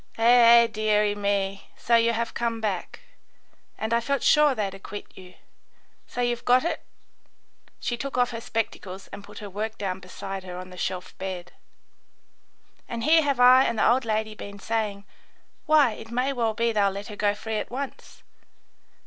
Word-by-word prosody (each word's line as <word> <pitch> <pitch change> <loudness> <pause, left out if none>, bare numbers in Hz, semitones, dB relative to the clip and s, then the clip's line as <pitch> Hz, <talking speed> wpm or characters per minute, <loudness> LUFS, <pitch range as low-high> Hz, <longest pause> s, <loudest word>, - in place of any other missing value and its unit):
"Eh, 235 0 +7
eh, - - +2
deary 210 -2 +1
me, 200 -1 -2
so 235 - +2
you 230 0 +4
have 230 0 -2
come 230 -1 -2
back. 205 -5 -3 0.8
And 220 +1 -2
I 235 - +3
felt 280 +3 -1
sure 300 -3 +5
they'd 200 -4 -2
acquit 195 +1 -9
you. 180 -1 -13 0.7
So 245 - -4
you've 240 -1 -1
got 250 +2 +4
it?" 340 - -2 1.0
She 240 - -2
took 275 +1 -5
off 245 -1 +2
her 230 -1 -5
spectacles 195 -4 -4
and 200 0 -9
put - - -13
her 210 - -7
work 215 +3 -4
down 190 -2 -3
beside 190 +1 -7
her 180 -1 -7
on 185 0 -8
the - - -10
shelf 180 0 -4
bed. 180 -2 -5 1.4
"And 230 -1 -4
here 320 +3 +5
have 280 -4 0
I 255 +1 +7
and 230 - -1
the - - +3
old 255 +2 +3
lady 220 -1 -1
been 200 -1 -9
saying, 210 -2 -3 0.6
'Why, 300 -5 +5
it 225 +1 -10
may 250 +4 0
well 230 -4 0
be 230 +1 +1
they'll 205 -2 +2
let 200 +2 -7
her 210 - -7
go 205 0 +1
free 220 +1 -4
at - - -4
once. 270 +2 -7
220 Hz, 185 wpm, -25 LUFS, 200-240 Hz, 1.4 s, Eh